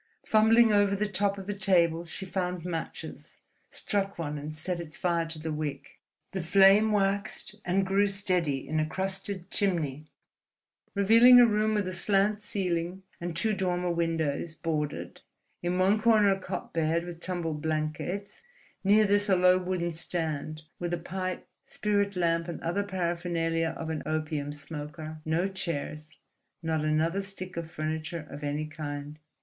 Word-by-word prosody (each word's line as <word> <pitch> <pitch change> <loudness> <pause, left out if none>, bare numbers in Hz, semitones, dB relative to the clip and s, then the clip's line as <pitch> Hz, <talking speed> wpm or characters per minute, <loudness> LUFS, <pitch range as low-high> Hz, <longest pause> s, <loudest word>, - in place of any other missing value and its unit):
Fumbling 220 +1 +5
over 205 -1 +4
the 210 +1 0
top 200 0 0
of 195 - -7
the 205 - -2
table, 175 -4 +2
she 180 +3 -6
found 180 -2 -3
matches, 165 -2 -6 0.3
struck 200 -1 -2
one, 150 -3 -3
and 150 +2 -6
set 175 +3 -3
its 165 -2 -6
fire 170 -2 0
to 165 0 -6
the 155 0 -4
wick. 150 -2 -5 0.3
The 190 - -3
flame 195 +5 +6
waxed 200 +1 0
and 190 +2 +1
grew 195 +2 +3
steady 180 -9 0
in 155 +2 0
a 155 - +2
crusted 190 +1 -3
chimney, 155 -7 -1 0.9
revealing 230 +5 +8
a 245 - +9
room 215 -1 +2
with 205 -3 0
a - - -2
slant 200 +3 +2
ceiling 180 -3 -2 0.2
and 170 -1 -4
two 215 +5 +1
dormer 180 -2 0
windows, 165 -2 -1
boarded; 150 -4 -3 0.4
in 175 +1 -1
one 195 +4 +3
corner 215 -3 +5
a 195 - -5
cot 185 -1 -6
bed 165 +1 +1
with 175 -1 -8
tumbled 170 -4 -3
blankets, 160 +5 -3 0.4
near 210 +2 +5
this 205 +1 +2
a 190 - +5
low 180 0 +5
wooden 180 -2 -2
stand, 155 -2 -3 0.2
with 175 0 -1
a - - -5
pipe, 185 +2 -4 0.2
spirit 205 -1 0
lamp, 165 -1 +1
and 170 - -5
other 175 +4 0
paraphernalia 170 -3 -1
of 160 0 -4
an 155 - -3
opium 155 -2 -2
smoker—no 155 +3 -4
chairs, 155 -4 -4 0.5
not 160 -1 0
another 160 +5 +1
stick 195 -1 -7
of 165 -1 -4
furniture 155 +1 -4
of 145 +1 -8
any 145 +1 -1
kind. 150 -1 -6
175 Hz, 155 wpm, -29 LUFS, 160-195 Hz, 0.9 s, a